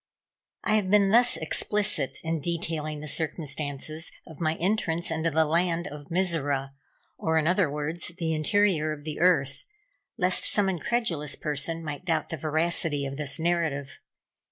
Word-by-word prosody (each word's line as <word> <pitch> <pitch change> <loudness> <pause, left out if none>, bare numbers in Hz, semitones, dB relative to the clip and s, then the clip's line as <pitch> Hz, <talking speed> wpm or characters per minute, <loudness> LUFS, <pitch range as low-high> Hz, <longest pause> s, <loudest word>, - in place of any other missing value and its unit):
I 215 - +2
have 195 -3 -1
been 200 -1 +4
thus 240 +2 +7
explicit 210 -9 +1
in 165 0 -2
detailing 160 -2 -1
the 150 - -7
circumstances 155 0 -3
of 160 -1 -12
my 155 0 +1
entrance 170 -3 -1
into 160 +1 0
the 160 0 +2
land 170 +2 0
of 145 +1 -9
Mizora, 150 -7 0 0.5
or, 160 0 0
in 155 - +1
other 180 -2 +2
words, 150 +5 -4
the 165 -2 -1
interior 155 -1 +1
of 145 -1 -10
the 155 -1 -5
earth, 140 -7 +1 0.5
lest 180 -3 +5
some 205 -2 +2
incredulous 175 - -1
person 155 +3 -3
might 145 +1 -6
doubt 160 -3 -1
the 160 - -4
veracity 155 -1 +1
of 135 0 -5
this 145 -2 -1
narrative. 160 -5 -2
160 Hz, 155 wpm, -26 LUFS, 150-175 Hz, 0.5 s, thus